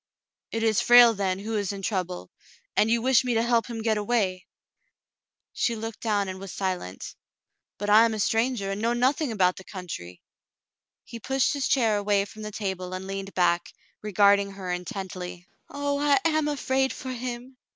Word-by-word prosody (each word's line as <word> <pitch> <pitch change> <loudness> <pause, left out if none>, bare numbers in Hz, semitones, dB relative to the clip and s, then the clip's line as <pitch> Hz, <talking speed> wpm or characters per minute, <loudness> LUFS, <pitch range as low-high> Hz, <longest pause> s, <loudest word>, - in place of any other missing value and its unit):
"It 225 0 -3
is 220 -2 +3
Frale, 240 -1 +8
then, 190 -3 -1
who 215 +3 -4
is 205 -2 -1
in 200 -1 -7
trouble! 185 -3 -3 0.4
And 215 - +3
you 230 0 +1
wish 260 0 +4
me 245 -2 -1
to 225 - +2
help 235 -2 +2
him 230 -2 -5
get 220 -2 +1
away? 205 -4 -1 0.5
" - - -64
She 235 - +2
looked 225 0 -6
down 205 -3 0
and 185 0 -6
was 195 -1 -8
silent. 185 - -4 0.6
"But 205 +1 -2
I 215 +2 +8
am 225 -1 0
a - - -5
stranger, 225 -1 0
and 200 +1 -4
know 230 +1 +1
nothing 260 +3 +1
about 185 -4 +2
the 190 - -9
coun 185 -1 -8
try." 90 - -7 0.9
He 235 - -9
pushed 265 +5 +1
his 280 -2 -1
chair 225 -6 +2
away 205 -1 +1
from 215 +2 -12
the 215 - -5
table 190 -3 -4
and 185 +1 -6
leaned 195 0 -6
back, 175 -1 +1 0.3
regarding 200 -1 +3
her 190 -2 -5
intently. 180 0 -6 0.2
"Oh, 285 0 -2
I 290 +2 +3
am 310 -2 +2
afraid 265 -2 0
for 260 - -6
him." 250 +1 -6
210 Hz, 190 wpm, -26 LUFS, 190-240 Hz, 0.9 s, Frale